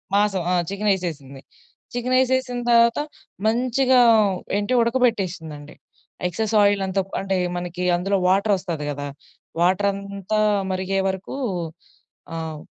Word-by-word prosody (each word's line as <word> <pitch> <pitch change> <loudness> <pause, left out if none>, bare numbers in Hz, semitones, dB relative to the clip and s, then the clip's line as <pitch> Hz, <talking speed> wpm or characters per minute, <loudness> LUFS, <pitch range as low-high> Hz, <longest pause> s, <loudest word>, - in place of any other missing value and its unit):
మాసం 205 -3 +2
ఆ! - - +2 0.2
చికెనెసేసింది. 175 -10 -2 0.5
చికెనెసేసిన 255 0 +1
తర్వాత 235 +2 +5 0.5
మంచిగా 255 +2 +3 0.6
ఏంటి 205 +5 -1
ఉడకబెట్టేసిందండి. 185 - -1 0.5
ఎక్సెస్ 215 +5 -2
ఆయిల్ 200 -1 +3
అంతా 195 +1 0
క్ - - -24
అంటే 195 0 -1 0.2
మనకి 175 0 -4
అందులో 195 +3 0
వాటరొస్తది 185 -5 +1
గదా! 145 0 -5 0.5
వాటరంతా 200 +2 0 0.3
మరిగే 190 +1 -1
వరకు 190 +6 -4 1.0
ఆహ్, 160 -2 -5
195 Hz, 100 wpm, -22 LUFS, 180-230 Hz, 1.0 s, తర్వాత